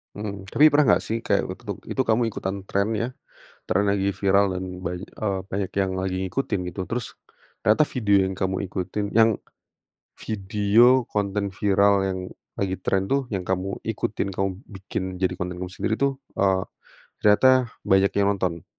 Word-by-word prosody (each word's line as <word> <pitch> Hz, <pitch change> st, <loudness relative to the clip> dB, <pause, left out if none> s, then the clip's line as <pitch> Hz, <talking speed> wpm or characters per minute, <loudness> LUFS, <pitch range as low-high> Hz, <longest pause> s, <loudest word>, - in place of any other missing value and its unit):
Mmm, 100 Hz, -2 st, -5 dB
tapi 155 Hz, +2 st, +7 dB
pernah 150 Hz, 0 st, +4 dB
enggak -, -, +3 dB
sih 115 Hz, -, -1 dB
kayak -, -, +2 dB
untuk -, -, -7 dB
itu -, -, 0 dB
kamu 115 Hz, 0 st, +2 dB
ikutan 100 Hz, -3 st, -3 dB
tren 100 Hz, +1 st, +1 dB
ya, 115 Hz, -, -1 dB, 0.6 s
tren 100 Hz, +2 st, +1 dB
lagi 100 Hz, -1 st, +1 dB
viral 100 Hz, -1 st, +2 dB
dan 95 Hz, -, -4 dB, 0.2 s
banyak, 90 Hz, +2 st, -4 dB
eee, 100 Hz, -3 st, -3 dB
banyak 95 Hz, -1 st, -2 dB
yang 95 Hz, -, +1 dB
lagi 95 Hz, 0 st, -2 dB
ngikutin 100 Hz, 0 st, -2 dB
gitu, 90 Hz, +2 st, -5 dB
terus 120 Hz, -1 st, -3 dB, 0.5 s
ternyata 110 Hz, +8 st, +4 dB
video 105 Hz, -6 st, +3 dB
yang 95 Hz, -, -3 dB
kamu 95 Hz, 0 st, -1 dB
ikutin 95 Hz, +2 st, -3 dB
yang, 115 Hz, 0 st, +6 dB, 0.8 s
video 110 Hz, +5 st, +3 dB
konten 100 Hz, -1 st, -1 dB
viral 100 Hz, 0 st, +3 dB
yang 95 Hz, -1 st, -2 dB, 0.4 s
lagi 95 Hz, -1 st, -1 dB
tren 95 Hz, +1 st, +1 dB
tuh, 135 Hz, -1 st, +1 dB
yang 95 Hz, -2 st, -2 dB
kamu 95 Hz, +1 st, -2 dB
ikutin, 105 Hz, -2 st, -2 dB
kamu 95 Hz, +1 st, 0 dB, 0.2 s
bikin 95 Hz, -2 st, -6 dB, 0.2 s
jadi 95 Hz, -, +1 dB
konten 90 Hz, 0 st, -4 dB
kamu 90 Hz, -, -4 dB
sendiri 95 Hz, +3 st, -2 dB
tuh, 140 Hz, -1 st, +1 dB, 0.2 s
eee, 95 Hz, -1 st, +1 dB, 0.6 s
ternyata 125 Hz, +4 st, +5 dB, 0.2 s
banyak 95 Hz, 0 st, +3 dB
yang 100 Hz, 0 st, +3 dB
nonton? 90 Hz, -4 st, -2 dB
100 Hz, 165 wpm, -24 LUFS, 95-110 Hz, 0.8 s, tapi